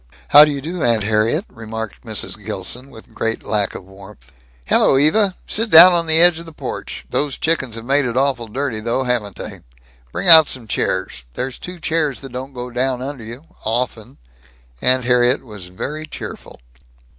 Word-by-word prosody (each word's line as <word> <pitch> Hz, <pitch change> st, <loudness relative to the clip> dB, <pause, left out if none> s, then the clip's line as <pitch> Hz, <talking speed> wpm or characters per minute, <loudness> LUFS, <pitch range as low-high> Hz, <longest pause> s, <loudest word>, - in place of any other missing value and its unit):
"How 145 Hz, +1 st, +9 dB
do 150 Hz, -, -2 dB
you 140 Hz, -1 st, -4 dB
do, 165 Hz, +3 st, -5 dB
Aunt 115 Hz, -3 st, +2 dB
Harriet," 110 Hz, -, 0 dB
remarked 110 Hz, -1 st, -8 dB
Mrs. 110 Hz, -2 st, -4 dB
Gilson, 110 Hz, +6 st, -5 dB
with 110 Hz, -4 st, -16 dB
great 115 Hz, 0 st, -3 dB
lack 105 Hz, -2 st, -1 dB
of 95 Hz, -, -9 dB
warmth. 95 Hz, -8 st, -16 dB, 0.3 s
"Hello, 135 Hz, -, +3 dB
Eva. 185 Hz, +7 st, +3 dB
Sit 225 Hz, +1 st, -1 dB
down 175 Hz, +2 st, +9 dB
on 170 Hz, -1 st, 0 dB
the 160 Hz, 0 st, +4 dB
edge 175 Hz, -1 st, +7 dB
of 170 Hz, -, -11 dB
the -, -, -10 dB
porch. -, -, -7 dB
Those 145 Hz, -2 st, -1 dB
chickens 135 Hz, -8 st, -1 dB
have 115 Hz, 0 st, -7 dB
made 140 Hz, +2 st, +2 dB
it 120 Hz, 0 st, -3 dB
awful 130 Hz, -4 st, 0 dB
dirty, 125 Hz, 0 st, -3 dB
though, 115 Hz, +4 st, -1 dB
haven't 120 Hz, -6 st, -2 dB
they? -, -, -8 dB, 0.5 s
Bring -, -, -2 dB
out 160 Hz, -3 st, +9 dB
some 125 Hz, -4 st, -7 dB
chairs. 65 Hz, -10 st, -2 dB
There's 125 Hz, 0 st, -5 dB
two 180 Hz, -1 st, -9 dB
chairs 155 Hz, -4 st, -1 dB
that 135 Hz, -2 st, -10 dB
don't 130 Hz, +2 st, -7 dB
go 125 Hz, 0 st, -7 dB
down 125 Hz, +1 st, -1 dB
under 135 Hz, -3 st, -6 dB
you 120 Hz, +7 st, -10 dB, 0.2 s
often." 115 Hz, +1 st, -3 dB, 0.6 s
Aunt 130 Hz, 0 st, +3 dB
Harriet 125 Hz, +2 st, +2 dB
was 105 Hz, -7 st, -10 dB
very 150 Hz, +12 st, -6 dB
cheerful. -, -, -9 dB
125 Hz, 185 wpm, -18 LUFS, 110-150 Hz, 0.6 s, How